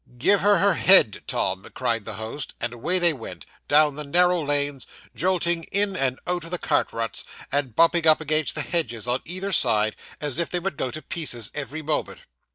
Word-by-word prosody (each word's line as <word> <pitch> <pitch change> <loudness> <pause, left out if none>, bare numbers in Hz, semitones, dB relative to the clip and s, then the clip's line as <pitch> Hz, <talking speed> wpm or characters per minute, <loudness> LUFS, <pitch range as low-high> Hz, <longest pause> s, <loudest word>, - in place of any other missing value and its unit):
'Give 195 +11 +3
her 205 0 +4
her 200 0 +3
head, 170 - +6
Tom,' 95 +1 -1
cried 115 -4 -1
the 110 - -6
host; 110 +7 -6
and 120 0 -2
away 165 +10 0
they 175 -2 +4
went, 110 - -9 0.2
down 150 0 +4
the 150 +2 -6
narrow 180 +4 +3
lanes; 145 -2 -1 0.3
jolting 175 -2 0
in 200 -1 0
and 130 -6 -1
out 175 -1 -2
of 165 - -8
the 180 - -2
cart - - 0
ruts, 115 -2 -3 0.3
and 140 -5 -1
bumping 165 0 +3
up 155 - +6
against 155 -1 -1
the 150 - -1
hedges 125 - -2
on 125 +2 0
either 185 +3 -4
side, 110 - +2 0.2
as 145 -2 -2
if 170 - -1
they 180 - -1
would 190 -1 -3
go 130 - -2
to 155 +5 -7
pieces 120 -10 -2
every 150 +2 -6
moment. 150 0 -2
150 Hz, 200 wpm, -24 LUFS, 125-175 Hz, 0.3 s, head